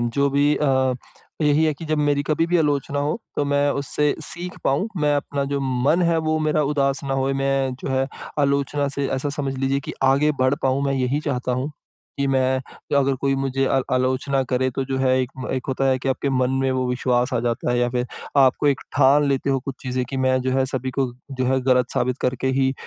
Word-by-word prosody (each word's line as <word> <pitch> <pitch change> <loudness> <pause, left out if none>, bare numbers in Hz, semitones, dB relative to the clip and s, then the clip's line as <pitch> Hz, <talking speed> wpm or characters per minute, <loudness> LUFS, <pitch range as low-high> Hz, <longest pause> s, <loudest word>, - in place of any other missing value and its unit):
जो 120 +4 +1
भी 145 +2 +3
अ, 130 -3 +2 0.5
यही 150 +1 +3
है 155 - +2
कि 155 - -9
जब 155 -1 -1
मेरी 145 -1 +2
कभी 155 +3 0
भी 175 +1 +2
आलोचना 145 -2 0
हो, 145 +7 -1 0.2
तो 145 - +1
मैं 145 0 +2
उससे 150 +1 +1
सीख 175 +3 -3
पाऊँ, 140 +9 +1
मैं 150 -3 +2
अपना 140 0 -2
जो 140 - 0
मन 135 +6 +1
है 165 - +2
वो 155 0 +1
मेरा 155 -1 +1
उदास 140 -1 +1
ना 135 -1 -1
होए। 135 0 0
मैं 135 -1 0
जो - - -5
है 130 0 +1 0.3
आलोचना 140 0 +1
से 140 -1 0
ऐसा 145 - -2
समझ 140 -1 -3
लीजिए 135 +1 0
कि - - -3 0.2
आगे 150 +2 +3
बढ़ 130 +1 +3
पाऊँ। 135 +1 +1
मैं 140 - +1
यही 130 +2 0
चाहता 130 -4 -2
हूँ 140 +4 -3 0.5
कि 140 - +1
मैं 130 0 +2 0.4
अगर 140 -1 +3
कोई 135 -1 +1
मुझे 135 0 0
आ 135 - +2
आलोचना 130 +2 +1
करे, 130 0 +1
तो 135 +2 -3
जो 135 0 -3
है 130 -1 +2
एक 130 -1 -2
म 130 - -5
एक 130 -2 -3
होता 135 0 0
है 130 -1 +2
कि 135 - -3
आपके 135 +1 -1
मन 130 -1 +1
में 135 - +1
वो 130 -1 0
विश्वास 125 0 0
आ - - +1
जाता 120 0 -1
है 120 - +1
या 120 0 +2
फ़िर 125 0 -1 0.3
आपको 135 +1 +4
एक 140 -2 +2 0.2
ठान 140 +3 +5
लेते 140 0 0
हो 135 - +2
कुछ 135 - -4
चीज़ें 130 -1 -2
की 135 - -3
मैं 130 0 +2
जो 130 - -1
है 135 - +3
सभी 130 0 -3
को 130 -3 0 0.2
जो 130 -1 -2
है 130 +1 +2
ग़लत 125 -1 +3
साबित 125 +1 0
करके 125 +1 -1
ही 130 0 +2
135 Hz, 235 wpm, -22 LUFS, 130-145 Hz, 0.5 s, ठान